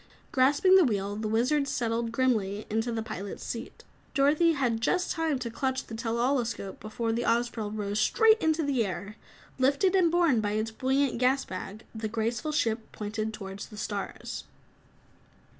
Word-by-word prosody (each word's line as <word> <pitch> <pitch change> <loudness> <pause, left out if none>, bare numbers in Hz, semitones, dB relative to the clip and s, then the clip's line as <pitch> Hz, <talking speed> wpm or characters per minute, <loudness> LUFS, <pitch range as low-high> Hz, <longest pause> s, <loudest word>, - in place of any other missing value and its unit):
Grasping 290 +8 +5
the 375 - +7
wheel, 205 -6 0
the 215 +1 -3
Wizard 250 +7 +2
settled 230 -2 -1
grimly 220 -5 0
into 225 +2 0
the 225 -1 -2
pilot's 205 -3 -6
seat. 235 +1 -6 0.3
Dorothy 300 +4 +4
had 245 -6 0
just 360 +9 +1
time 325 -4 0
to 245 -2 -5
clutch 260 +2 -2
the - - -10
tell 225 0 -2
all 260 +3 +2
escope 220 -5 -4
before 225 +1 -3
the 230 +1 0
Ozpril 230 -2 0
rose 205 -1 -2
straight 445 - +5
into 320 0 +2
the 275 -5 +1
air. 200 +1 -5 0.4
Lifted 280 +8 +3
and 370 -3 +4
borne 335 -9 +3
by 205 -1 -1
its 215 +1 -1
buoyant 265 +2 0
gas 260 +2 +2
bag, 195 +3 -7
the 220 -1 -3
graceful 230 +5 -2
ship 225 -7 -1
pointed 215 +1 -3
toward 195 -2 -8
the 210 - -8
stars. 205 -2 -4
230 Hz, 170 wpm, -28 LUFS, 215-275 Hz, 0.4 s, the